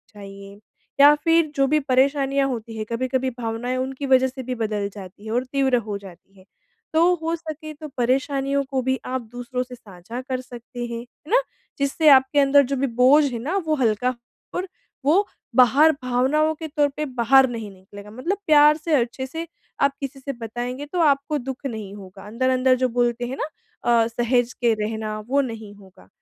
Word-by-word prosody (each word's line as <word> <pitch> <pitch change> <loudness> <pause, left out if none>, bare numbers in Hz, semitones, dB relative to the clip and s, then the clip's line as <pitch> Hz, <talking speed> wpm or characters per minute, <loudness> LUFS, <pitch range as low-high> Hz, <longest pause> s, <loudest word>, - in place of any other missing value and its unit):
चाहिए, 200 0 -11 0.4
या 290 +1 +9
फिर 330 -2 +3
जो 275 -1 +3
भी 305 +2 +3
परेशानियाँ 275 +1 +2
होती 230 -2 -5
हैं 215 - -3
कभी-कभी 255 +2 -1
भावनाएँ 235 +2 -3
उनकी 265 +2 -3
वजह 260 0 +5
से 260 0 -7
भी 250 - -1
बदल 210 -2 -1
जाती 200 +1 -11
है 220 - -5
और 250 +2 0
तीव्र 265 -2 +3
हो 205 -1 -3
जाती 195 +1 -15
है, 185 - -19 0.5
तो 340 +3 +4
हो 330 +1 0
सके 310 -1 -8
तो 305 +1 -9
परेशानियों 275 +3 0
को 260 -1 0
भी 260 +1 -1
आप 260 - -1
दूसरों 245 +1 -4
से 250 0 -11
साझा 215 +3 -9
कर 255 -1 -2
सकते 245 0 -8
हैं, 235 -1 -5
है 250 - -16
ना? - - +6 0.4
जिससे 280 +3 +3
आपके 265 +1 +5
अंदर 280 0 +5
जो - - +2
भी - - +2
बोझ 285 +4 +6
है 235 - -4
ना 320 +7 -2
वो 310 - +2
हल्का 250 -1 +1 0.4
और 365 +2 -2 0.4
वो 370 +8 +3 0.3
बाहर 270 +5 +6
भावनाओं 265 +6 +2
के 320 +1 -7
तौर 295 -1 +1
पर 305 - -1
बाहर 265 +3 +5
नहीं 225 -4 -6
निकलेगा 200 +2 -13
मतलब 335 - -3
प्यार 300 0 +6
से 315 0 -3
अच्छे 240 +3 -4
से, 325 +5 -6 0.3
आप 280 - +4
किसी 275 -1 -6
से 275 +1 -5
बताएँगे 245 +4 -5
तो 345 +4 -4
आपको 290 0 +2
दुख 265 +1 -7
नहीं 220 -6 -5
होगा 195 -1 -12
अंदर-अंदर 255 +3 +2
जो 255 - +3
बोलते 240 0 0
हैं 265 +2 -5
ना? - - -2 0.4
अ, 230 -1 +3
सहेज 240 +1 0
के 235 -2 +1
रहना 215 0 -3
वो 280 +3 +2
नहीं 220 -2 -8
होगा। 190 - -18
255 Hz, 190 wpm, -23 LUFS, 230-280 Hz, 0.5 s, या